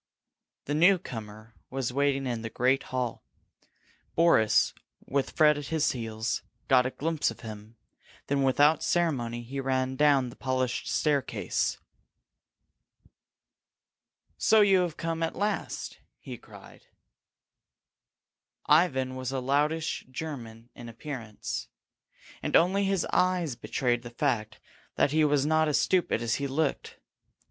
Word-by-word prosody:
The 145 - -2
newcomer 115 - 0 0.2
was 130 -2 -3
waiting 140 0 +1
in 120 -3 -2
the 115 - -5
great 130 +4 +2
hall. 125 -2 -3 0.9
Boris, 110 -11 +4 0.3
with 135 -1 -1
Fred 150 -1 +4
at 145 - -7
his 160 -2 +1
heels, 110 -3 -3 0.3
got 130 -2 +4
a - - -1
glimpse 160 +3 -1
of 115 - -9
him; 110 0 -9 0.5
then 140 0 0
without 145 +4 +4
ceremony 120 -9 0
he 135 +4 -6
ran 130 -1 -1
down 140 -3 +3
the - - -12
polished 130 -2 -2
staircase. 145 -3 0 2.6
"So 220 -1 +5
you 195 -2 +5
have 175 -3 -1
come 165 0 -3
at 165 - -1
last!" 205 +1 -3 0.2
he - - -8
cried. - - -15 1.8
Ivan 135 -5 +3
was 130 0 -4
a 135 - -1
loutish 150 +5 0
German 120 -5 -7
in 120 -1 -10
appearance, 115 -3 -6 0.7
and - - -1
only 195 +4 +4
his 195 -2 +1
eyes 180 -7 +1
betrayed 120 -1 -1
the 120 - -9
fact 120 -4 -2 0.4
that 140 - +2
he 155 +1 +3
was 145 -2 +2
not 155 +1 +3
as 150 - +2
stupid 175 -10 +1
as 115 -1 0
he 140 - -2
looked. 140 +1 -2
135 Hz, 130 wpm, -28 LUFS, 120-155 Hz, 2.6 s, So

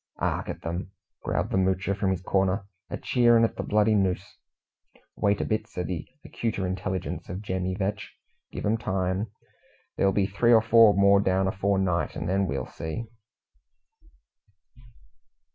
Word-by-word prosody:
"'Ark - - -2
at - - -7
'em," 85 +3 -3 0.3
growled - - -2
the - - +1
Moocher 95 +1 +1
from 100 -1 0
his 95 -1 -2
corner, 95 +1 +1 0.2
"a - - -4
cheerin' 120 -2 +4
at 115 - +1
the - - -3
bloody 105 +1 +2
noos!" 95 -1 -1 0.8
"Wait 100 -1 +1
a - - -1
bit," 110 - -1
said 90 - -5
the 90 -4 -4 0.2
acuter 110 -5 -3
intelligence 95 0 -4
of 90 +4 -5
Jemmy 95 -2 -2
Vetch. 100 +2 -3 0.4
"Give - - -5
'em 110 +2 +1
time. 95 +1 -1 0.7
There'll 100 - +3
be 100 0 +1
three 110 +5 +3
or 110 - +7
four 115 -2 +6
more 100 0 +5
down 95 -1 +1
afore 100 +1 0
night, 90 -3 0
and 85 - -4
then 95 +2 +1
we'll 70 -4 -2
see!" 80 +8 -6
95 Hz, 160 wpm, -26 LUFS, 95-105 Hz, 0.8 s, or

